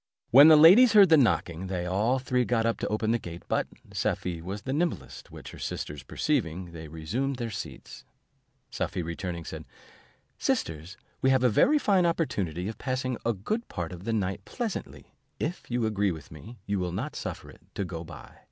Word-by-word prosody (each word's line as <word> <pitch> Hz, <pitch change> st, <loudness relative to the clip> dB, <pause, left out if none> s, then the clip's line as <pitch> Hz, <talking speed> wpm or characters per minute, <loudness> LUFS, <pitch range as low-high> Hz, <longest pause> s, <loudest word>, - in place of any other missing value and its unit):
When 140 Hz, +5 st, +10 dB
the 160 Hz, -, +9 dB
ladies 195 Hz, +10 st, +8 dB
heard 200 Hz, -4 st, +8 dB
the 160 Hz, -, +8 dB
knocking, 95 Hz, -, +1 dB
they 90 Hz, -2 st, -3 dB
all 105 Hz, +8 st, +1 dB
three 125 Hz, -1 st, 0 dB
got 115 Hz, -2 st, 0 dB
up 115 Hz, -, 0 dB
to -, -, -2 dB
open 110 Hz, +1 st, 0 dB
the 120 Hz, -, +1 dB
gate; 85 Hz, -3 st, -9 dB
but -, -, 0 dB, 0.3 s
Safie 85 Hz, -3 st, -2 dB
was 100 Hz, +4 st, -6 dB
the 130 Hz, -, -3 dB
nimblest; 170 Hz, +3 st, -3 dB
which -, -, -10 dB
her -, -, -12 dB
sisters 75 Hz, -1 st, -5 dB
perceiving, 90 Hz, -, -2 dB
they 80 Hz, -1 st, -9 dB
resumed 105 Hz, -, -3 dB
their 120 Hz, -2 st, -4 dB
seats. -, -, -8 dB, 0.7 s
Safie 90 Hz, -, -3 dB
returning, 85 Hz, 0 st, -5 dB
said, -, -, -7 dB, 0.8 s
"Sisters, 80 Hz, +6 st, -2 dB, 0.2 s
we 130 Hz, -, +3 dB
have 130 Hz, -1 st, +3 dB
a 125 Hz, -, +5 dB
very 290 Hz, -, +4 dB
fine 195 Hz, -10 st, +3 dB
opportunity 100 Hz, -, -1 dB
of 110 Hz, -, -6 dB
passing 130 Hz, -1 st, -2 dB
a 115 Hz, -, +2 dB
good 215 Hz, -, -3 dB
part 85 Hz, -4 st, -5 dB
of 90 Hz, +1 st, -9 dB
the 115 Hz, -, -1 dB
night 100 Hz, -4 st, -2 dB
pleasantly, 230 Hz, -7 st, -6 dB, 0.3 s
and 150 Hz, -, 0 dB
if 180 Hz, -, -19 dB
you 120 Hz, -1 st, 0 dB
agree 105 Hz, -2 st, +1 dB
with 80 Hz, -3 st, -9 dB
me, 110 Hz, +10 st, -11 dB
you 100 Hz, -1 st, -1 dB
will 90 Hz, -1 st, -2 dB
not 90 Hz, -, -4 dB
suffer -, -, -6 dB
it -, -, -19 dB
to 100 Hz, -, -2 dB
go 85 Hz, -2 st, -6 dB
by. 80 Hz, -3 st, -12 dB
110 Hz, 200 wpm, -28 LUFS, 90-130 Hz, 0.8 s, When